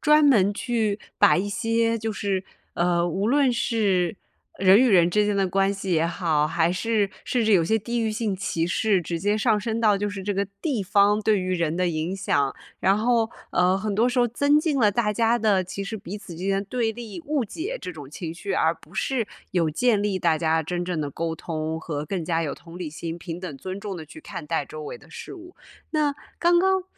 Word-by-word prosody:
专 300 0 +5
门 205 -8 +5
去 220 -2 -1 0.2
把 205 - +6
一 195 +3 -1
些 230 +1 +1
就 225 0 -3
是， 195 -2 -2 0.3
呃， 175 0 +2
无 190 +4 -1
论 275 -1 +3
是 205 -6 +1 0.4
人 190 +1 +6
与 255 - +5
人 175 -4 +5
之 210 +3 +3
间 205 0 0
的 195 -1 +2
关 195 +2 +2
系 195 -1 -3
也 165 0 +3
好， 160 -3 +1
还 165 +2 +1
是 210 +2 0 0.2
甚 245 - 0
至 220 - +3
有 175 -4 +5
些 220 +6 +2
地 235 +3 -2
域 220 -1 0
性 215 -3 -1
歧 170 -3 -1
视 195 +2 +2
直 170 0 -3
接 205 +4 +1
上 220 -1 +3
升 225 +1 -2
到 215 -3 +4
就 205 +1 -2
是 200 -1 -6
这 205 +1 -2
个 200 +1 +1 0.2
地 270 -10 -1
方 205 +2 +3
对 210 -2 +3
于 185 0 -1
人 165 -3 0
的 180 +1 +1
影 165 +2 -2
响。 145 -8 0 0.2
然 195 +1 +3
后， 230 0 +2 0.2
呃， 180 +1 +3
很 205 +1 -2
多 225 +4 +3
时 250 0 0
候 240 - +4
增 285 +5 +3
进 305 -3 0
了 215 -4 +5
大 210 0 +1
家 230 +2 +2
的 205 -5 +2
其 185 +2 -5
实 220 +3 -4
彼 200 0 -7
此 200 -4 -10
之 180 - -6
间 195 0 +1
的 200 - -3
对 230 -2 0
立、 230 +5 -8
误 295 -5 0
解 360 - -5
这 - - -5
种 145 -5 -10
情 160 +1 -6
绪， 195 +3 -4
而 165 -2 +2
不 165 - -20
是 235 +2 0 0.3
有 170 -4 +2
建 215 +5 +2
立 205 -2 0
大 170 -3 +2
家 160 0 +1
真 175 +3 -3
正 175 -3 -2
的 145 -1 -3
沟 165 +3 -3
通 160 0 -4
和 150 -2 -4
更 180 +3 -3
加 165 0 0
有 150 -3 -3
同 170 +1 -12
理 170 -4 -5
心、 165 +1 -5
平 170 0 -6
等、 175 -7 -6
尊 185 +6 -6
重 200 -2 -5
地 160 - -7
去 155 - -12
看 - - -8
待 - - -1
周 470 - -8
围 475 +3 -7
的 - - -19
事 - - -9
物。 355 -1 -13 0.3
那 300 -2 +1 0.2
刚 345 0 +4
刚 380 0 +2
200 Hz, 255 characters per minute, -24 LUFS, 175-230 Hz, 0.4 s, 把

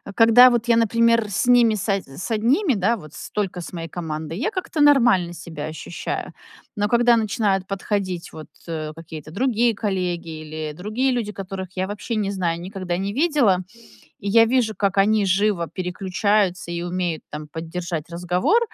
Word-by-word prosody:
когда 230 +2 +8
вот 240 -1 0
я, 235 - +5
например, 230 0 +3
с 195 - 0
ними 240 -3 +5
с 205 - -4
од 200 -2 +1
с 140 - -7
одними, 255 - +2
да, 215 +3 +1
вот 155 -6 -13
столько 195 -4 -4
с 165 - -8
моей 165 -2 -5
командой, 160 -1 -5
я 305 - -1
как-то 370 -5 -3
нормально 235 -12 +5
себя 160 -3 -7
ощущаю. 160 +2 -5 0.4
Но 205 0 0
когда 240 0 +5
начинают 205 -4 0
подходить, 195 -2 -3
вот, 155 - -9 0.2
э, 155 -2 -4
какие-то 155 -2 -10
другие 235 +3 +1
коллеги 180 -5 -2
или 155 0 -6
другие 215 - -1
люди, 235 -4 -2
которых 195 -2 -6
я 185 +1 0
вообще 210 +3 -4
не 205 -2 -1
знаю, 175 -4 -1
никогда 185 -1 -4
не 195 +2 -3
видела, 275 - +3 0.6
и 200 - -6
я 225 +2 +6
вижу, 230 -2 +1
как 195 0 0
они 205 +1 +4
живо 190 -2 +1
переключаются 185 +1 -1
и 170 0 -3
умеют, 175 -2 -2
там, 150 0 -7
поддержать 165 +1 -5
разговор. 180 - +1
195 Hz, 170 wpm, -22 LUFS, 175-230 Hz, 0.6 s, когда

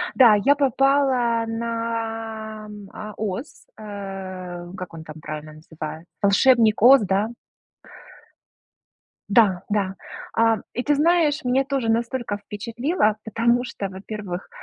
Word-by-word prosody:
Да, 240 -5 +7
я 285 +2 +6
попала 270 -4 +2
на, 225 -1 -4 0.3
а, 215 0 -7
"Оз", 215 +6 -5
э, 190 -4 -7
как 185 -2 -7
он 160 -1 -9
там 155 0 -10
правильно 155 0 -7
называет, 155 +1 -8
"Волшебник 215 +2 +4
Оз", 265 +3 +9
да? 200 +3 0 2.0
Да, 200 -4 +4
да. 200 -3 0 0.4
А, 225 -1 +3 0.2
и 245 - -1
ты 290 +3 +2
знаешь, 310 0 +3
мне 255 +2 +2
тоже 270 -4 -1
настолько 235 -1 -1
впечатлило, 220 - -1
потому 235 +3 +1
что, 200 -5 -5
во-первых, 190 -1 -6
220 Hz, 115 wpm, -23 LUFS, 195-245 Hz, 2.0 s, Оз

